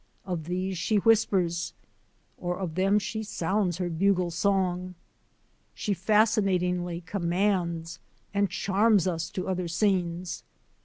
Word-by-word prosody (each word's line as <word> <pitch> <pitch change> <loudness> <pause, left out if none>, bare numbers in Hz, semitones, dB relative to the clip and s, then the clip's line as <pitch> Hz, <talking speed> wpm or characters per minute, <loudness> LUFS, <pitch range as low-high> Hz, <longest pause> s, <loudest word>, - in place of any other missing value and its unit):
Of 175 -5 -3
these 185 +1 -2
she 195 +6 0
whispers, 195 -6 +2 0.7
or 175 0 -2
of 185 -4 -4
them 195 +4 +3
she 220 +1 -2
sounds 190 -3 -1
her 180 -1 -1
bugle 180 +1 +1
song. 185 0 0 0.8
She 205 - -1
fascinat 210 0 +3
ingly 180 -1 -2
commands 170 -3 -1 0.3
and 200 -1 +2
charms 200 0 +2
us 170 -2 -1
to 185 - -4
other 185 -2 -1
scenes. 175 -1 0
185 Hz, 120 wpm, -27 LUFS, 175-200 Hz, 0.8 s, them